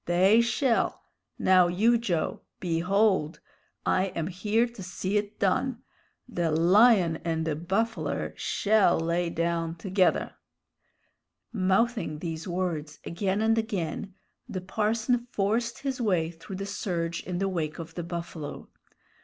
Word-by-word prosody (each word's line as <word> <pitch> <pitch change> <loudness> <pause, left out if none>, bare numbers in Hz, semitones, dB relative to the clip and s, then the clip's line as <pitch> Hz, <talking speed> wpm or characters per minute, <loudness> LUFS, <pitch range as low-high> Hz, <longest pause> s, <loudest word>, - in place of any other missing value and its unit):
They 190 +6 +5
shell! 235 +1 +1 0.3
Now, 185 -1 +5
you, 215 +7 +3
Joe! 175 -9 -1 0.2
Behold! 180 -1 +1 0.5
I 185 - +2
am 165 - -1
here 210 +6 +1
to 235 -4 -10
see 185 +2 -3
it 210 0 -1
done. 230 +5 0 0.4
The 175 -9 -1
lion 175 +2 +5
and 160 -1 -2
the 155 -2 -1
buffler 195 +8 -2
shell 210 -5 +2
lay 170 +1 0
down 165 0 -1
together!" 185 +1 +1 1.2
Mouthing 200 -2 +1
these 165 +1 -5
words 175 -4 -3
again 195 +4 -1
and 225 0 +3
again, 195 -3 -3 0.3
the 185 - -4
parson 220 +5 0
forced 230 +3 0
his 265 -2 -3
way 175 -7 +1
through 175 +4 -9
the 195 +1 -4
surge 170 -4 -3
in 180 -1 -4
the 195 +2 0
wake 165 -5 -2
of 165 -1 -8
the 175 - -4
buffalo. 170 -3 -6
185 Hz, 130 wpm, -27 LUFS, 170-215 Hz, 1.2 s, They